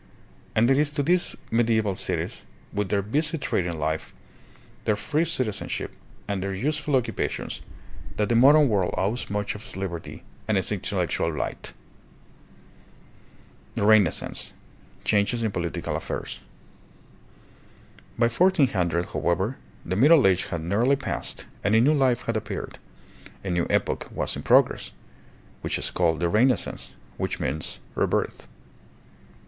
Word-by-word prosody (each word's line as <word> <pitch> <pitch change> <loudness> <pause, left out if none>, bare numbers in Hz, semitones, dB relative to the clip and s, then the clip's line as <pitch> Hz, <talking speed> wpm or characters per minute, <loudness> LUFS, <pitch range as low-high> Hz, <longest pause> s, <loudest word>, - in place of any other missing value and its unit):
And 110 +2 +4
it 135 - +4
is 150 0 +2
to 145 - 0
these 175 +4 +2 0.2
media> 115 -1 +3
val 100 -3 -1
cities, - - -2 0.3
with 105 -2 -1
their 100 0 +1
busy 150 - +1
trading 85 - -1
life, 80 +1 -3 0.7
their 105 - +3
free 150 +10 0
citizen 130 -11 -1
ship, - - -3 0.4
and 100 -2 -2
their 95 0 -2
useful 150 +6 0
occupations, 125 -3 -2 0.5
that 105 - +1
the 120 - +1
modern 145 +5 +7
world 100 -6 +1
owes 105 +7 -1
much 105 0 -1
of 105 - -9
its - - -6
liberty 85 -4 -5 0.2
and - - +2
its - - -1
intellectual 85 - 0
light. 75 - -4 2.0
The 100 - 0
Renaissance. 105 -6 +3 0.5
Changes 110 +3 +2
in 110 - 0
Political 85 -3 -3
Affairs. 65 - -4 1.8
By 115 - +4
1400, 115 - +2
however, 95 +9 0 0.3
the 90 - -2
Middle 145 - +6
Age 95 -1 +3
had 85 -3 -4
nearly 115 +10 +2
passed 135 -1 -3 0.2
and 100 +3 +3
a - - +6
new 140 +6 +5
life 130 -5 +2
had 115 - -2
appeared, 110 - -4 0.6
a 95 - -3
new 85 -1 +1
epoch - - 0
was - - -2
in - - -5
progress, - - +3 0.7
which - - -1
is - - -2
called 80 -3 +1
the 85 - +2
Renaissance, 120 +8 +1 0.2
which - - -2
means 70 +4 -2
" - - -27
rebirth." - - -1
105 Hz, 145 wpm, -25 LUFS, 95-130 Hz, 2.0 s, modern